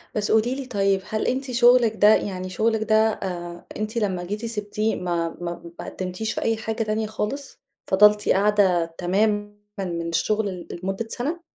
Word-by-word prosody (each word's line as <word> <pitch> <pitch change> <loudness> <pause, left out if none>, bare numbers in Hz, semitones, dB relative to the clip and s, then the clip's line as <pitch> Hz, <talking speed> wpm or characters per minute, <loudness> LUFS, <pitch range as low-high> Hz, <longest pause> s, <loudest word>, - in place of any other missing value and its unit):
بس 210 -1 0
قولي 220 +4 +3
لي 270 -1 -5
طيب، 195 -4 +1
هل 215 0 -1
أنتِ 260 +1 -1
شُغلِك 240 -2 +5
ده 210 +1 +6
يعني 185 -2 -3
شُغلِك 220 +3 0
ده 220 0 +2
آآ 180 -6 -1
أنتِ 215 +2 -3
لمّا 190 -5 -1
جيتِ 210 +5 -4
سيبتيه 215 0 -1
ما 170 -2 -2
ما 170 -1 -6
ما - - -6
قدمتيش 185 +4 -4
في - - -3
أي 225 -1 +1
حاجة 220 +1 -2
تانية 215 0 -1
خالص؟ 240 +6 -5 0.3
فضلتِ 210 +2 +5
قاعدة 195 -3 +3
تمامًا 205 +3 0 0.3
من 170 -3 -3
الشغل 210 +5 0 0.2
ل - - -7
لمدة 195 +4 -3
سنة؟ 315 +8 -2
210 Hz, 170 wpm, -24 LUFS, 185-220 Hz, 0.3 s, ده